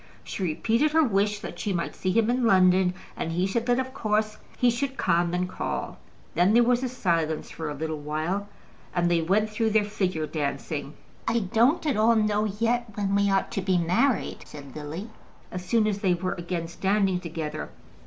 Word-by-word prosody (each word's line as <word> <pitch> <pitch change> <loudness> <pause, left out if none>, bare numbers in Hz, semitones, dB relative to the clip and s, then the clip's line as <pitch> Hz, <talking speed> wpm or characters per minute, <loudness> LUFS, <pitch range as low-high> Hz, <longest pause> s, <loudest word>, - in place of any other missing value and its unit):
She - - -6
repeated 230 - +1
her 320 0 +5
wish 205 -4 +1
that - - -7
she 205 - -1
might 170 -2 -2
see 185 - -1
him 225 +2 +3
in 250 0 0
London, 185 -3 +4 0.2
and 165 - -3
he 180 +2 +1
said 230 +5 -1
that 245 0 +3
of 260 0 -2
course 215 -3 0 0.2
he 245 -1 +4
should 270 +3 -3
come 170 -1 +2
and 180 +1 0
call. - - -4 0.3
Then 185 +5 +3
there 240 - +7
was 245 +1 +1
silence 165 -9 -1
for 160 -2 -5
a 145 - -4
little 155 +1 -3
while, 160 +7 -2 0.5
and 175 -1 +2
they 170 -1 +3
went 210 +6 +1
through 220 +1 +1
their 215 0 +3
figure 185 -6 -1
dancing. 150 -1 -3 0.3
"I 235 - +2
don't 235 - +2
at 285 -8 +1
all 225 +2 +4
know 215 -1 +2
yet 230 +4 0
when 200 -1 -1
we 200 0 +3
are 195 0 +3
to 210 -4 -2
be 185 -1 +2
married," 180 +10 +1
said 140 -3 -11
Lily, 155 +9 -6 0.4
as 180 0 -5
soon 215 +4 +2
as 205 -2 0
they 190 -3 +2
were 185 +1 -2
again 170 -1 -4
standing 195 +1 +1
together. 160 -3 -5
195 Hz, 195 wpm, -26 LUFS, 170-225 Hz, 0.5 s, there